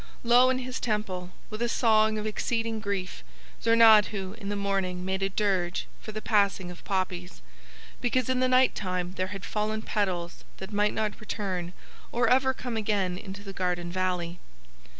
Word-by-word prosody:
Low 245 +2 +6
in 260 - +2
his 255 0 -4
Temple, 205 -6 -2 0.2
with 215 +1 -5
a 240 - +1
song 220 -2 +3
of 210 - -3
exceeding 225 +1 -1
grief, 200 - -4 0.4
Zornadhu 215 -4 +5
in 205 -3 -7
the 205 - -1
morning 195 -2 -1
made 190 0 -1
a 195 - +1
dirge 190 -3 0 0.2
for 215 - -7
the 215 0 -6
passing 200 -4 +2
of 175 - -12
poppies, 180 - -3 0.6
because 250 0 +1
in 260 -1 +1
the 255 - +3
night 255 0 +5
time 180 -2 -2
there 185 0 -2
had 195 -1 -7
fallen 215 +1 -2
petals 180 -5 -2
that 190 +2 -8
might 210 +1 +2
not 215 -1 -1
return 185 -5 -4 0.4
or 240 0 +2
ever 265 +2 +4
come 245 -3 -5
again 200 -4 0
into 195 +2 -8
the 195 -1 -8
garden 180 -2 -2
valley. 180 -2 -2
205 Hz, 170 wpm, -28 LUFS, 185-220 Hz, 0.6 s, Low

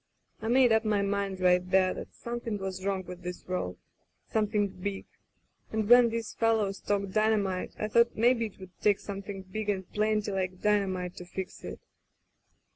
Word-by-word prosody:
I 220 - -3
made 245 0 +5
up 220 0 +4
my 210 -2 +1
mind 200 -1 -1
right 180 0 +5
there 185 -1 +4
that - - -9
some 240 0 -5
thing 230 -3 -3
was 190 -1 -5
wrong 195 -1 -1
with 180 0 -9
this 180 0 -6
world 180 - -2 0.3
— - - -34
^something 210 -3 0
big, 200 0 -3 0.7
and 220 -1 -1
when 240 0 +8
these 230 -1 -4
fellows 220 -4 +1
talked 200 -1 -1
dynamite, 210 -3 +1
I 215 - -1
thought 235 +2 +3
maybe 230 0 +3
it 205 - -17
would 185 -1 -10
take 205 -2 +4
something 200 -1 -6
big 210 +3 -4
and 190 -3 -1
plen^ 215 0 +1
like 185 -1 -2
dynamite 190 -3 0
to 180 - -8
fix 185 +1 -6
it. - - -7
200 Hz, 185 wpm, -29 LUFS, 185-220 Hz, 0.7 s, when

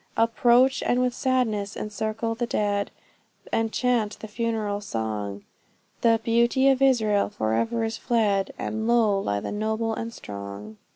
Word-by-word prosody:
Approach, 240 +3 +4
and 245 - +1
with 250 -1 +1
sadness 225 -6 0
encircle 220 +2 -3
the 235 +1 -3
dead 205 -2 0 0.6
And 225 -1 +1
chant 235 -4 0
the 220 - -7
funereal 215 -2 -2
song 110 - -4 0.6
The 230 -1 +4
'beauty 235 +3 +3
of 270 0 +2
Israel' 220 -7 +3
forever 115 - -1
is 225 0 -2
fled, 210 -5 +1
And 220 +1 -3
low 225 -4 +3
lie 100 - -1
the - - -4
noble 220 +2 -1
and 230 +1 -4
strong. 100 - -8
220 Hz, 140 wpm, -25 LUFS, 200-235 Hz, 0.6 s, Approach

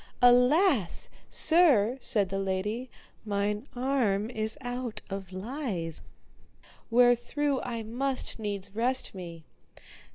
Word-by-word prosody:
Alas! 250 - +4 0.2
sir, 275 - +5
said 205 -6 +3
the 195 +1 -2
lady, 200 +6 -3 0.3
mine 210 +3 -2
arm 240 -5 0
is 220 +2 -2
out 245 -2 -3
of 195 -1 -6
lithe, 190 - -5 0.9
wherethrough 245 +4 +2
I 230 -2 -4
must 255 +3 -3
needs 200 -2 -4
rest 255 +3 0
me. 170 -4 -9
230 Hz, 100 wpm, -28 LUFS, 200-255 Hz, 0.9 s, sir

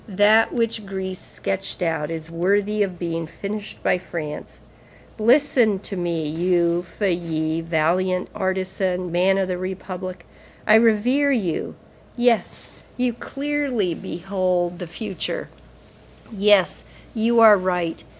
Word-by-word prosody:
That 210 +3 +4
which 230 -2 -1
Greece 190 -1 -4
sketched 195 -1 -4
out 160 -3 -1
is 165 0 -6
worthy 200 +5 +1
of 185 -3 -1
being 165 -1 -3
finished 200 +5 -7
by 180 - +2
France. 155 -4 -7 0.6
Listen 240 -2 +4
to 195 +1 -6
me, 170 -3 -2
you, 170 +1 +1
Feuilly, 170 -4 -2
valiant 175 +3 0
artisan, 185 -1 -2
man 185 +3 +3
of 190 -1 0
the 180 -1 -2
people. 185 0 -5 0.5
I 215 - +5
revere 235 +6 +4
you. 195 - -1 0.4
Yes, 240 -2 0 0.2
you 250 -1 +1
clearly 275 - -2
behold 180 0 -2
the 180 - -5
future, 195 +3 -5 0.9
yes, 200 -2 +3 0.3
you 230 +1 +2
are 220 -2 +9
right. 180 -3 -1
185 Hz, 120 wpm, -22 LUFS, 175-215 Hz, 0.9 s, are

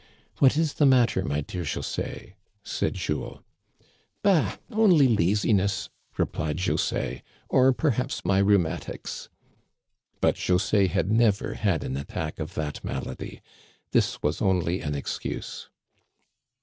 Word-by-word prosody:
" - - -33
What 135 +1 +5
is 160 -2 +1
the 145 - +4
matter, 120 -7 +4
my 75 -2 -1
dear 90 +5 -5
José? 80 +3 -4
" 105 -1 -45
said - - -2
Jules. - - -3 0.8
"Bah! 195 -6 +3
only 195 - +5
laziness," 100 -1 +2 0.3
replied 75 -1 -1
José, 90 +1 -1 0.3
"or 130 0 +5
perhaps 130 - -1
my 95 +1 +3
rheumatics." 95 -4 0 0.9
But - - +3
José 95 +1 +2
had 85 +4 0
never 110 -3 +2
had 95 -7 0
an 65 - -3
attack 80 +3 -5
of 80 +2 -5
that 75 -1 -4
malady. - - -6 0.5
This - - +1
was 75 +2 0
only 90 -2 +1
an 75 -2 -3
excuse. 70 - -5
100 Hz, 125 wpm, -26 LUFS, 85-125 Hz, 0.9 s, What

